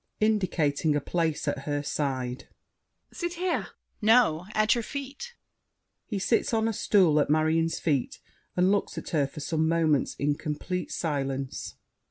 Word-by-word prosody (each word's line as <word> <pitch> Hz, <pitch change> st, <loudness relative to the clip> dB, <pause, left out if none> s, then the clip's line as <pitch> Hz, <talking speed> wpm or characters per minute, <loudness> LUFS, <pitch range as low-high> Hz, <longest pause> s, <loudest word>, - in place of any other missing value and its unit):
[Indicating 170 Hz, -8 st, +1 dB
a -, -, +2 dB
place 160 Hz, +1 st, -1 dB
at 140 Hz, -, -2 dB
her 145 Hz, -1 st, -1 dB
side. 130 Hz, -4 st, -2 dB, 0.7 s
Sit 345 Hz, -1 st, -3 dB
here! 360 Hz, 0 st, -1 dB
DIDIER. -, -, -18 dB, 0.3 s
No! 215 Hz, -7 st, +4 dB
at 215 Hz, 0 st, +4 dB
your 240 Hz, -, 0 dB
feet. 280 Hz, -, -7 dB, 0.7 s
[He 210 Hz, -, -3 dB
sits 225 Hz, +4 st, +1 dB
on 220 Hz, 0 st, +2 dB
a 225 Hz, -, 0 dB
stool 180 Hz, -7 st, +4 dB
at 145 Hz, -, +1 dB
Marion's 160 Hz, +2 st, +2 dB
feet 145 Hz, -6 st, -1 dB, 0.4 s
and 180 Hz, +2 st, +4 dB
looks 205 Hz, -, 0 dB
at -, -, -5 dB
her 145 Hz, -5 st, +1 dB
for 150 Hz, -, -9 dB
some 160 Hz, +1 st, 0 dB
moments 160 Hz, -4 st, +2 dB
in 145 Hz, +1 st, +1 dB
complete 155 Hz, +5 st, -4 dB
silence. 135 Hz, -4 st, -3 dB
165 Hz, 155 wpm, -27 LUFS, 145-215 Hz, 0.7 s, No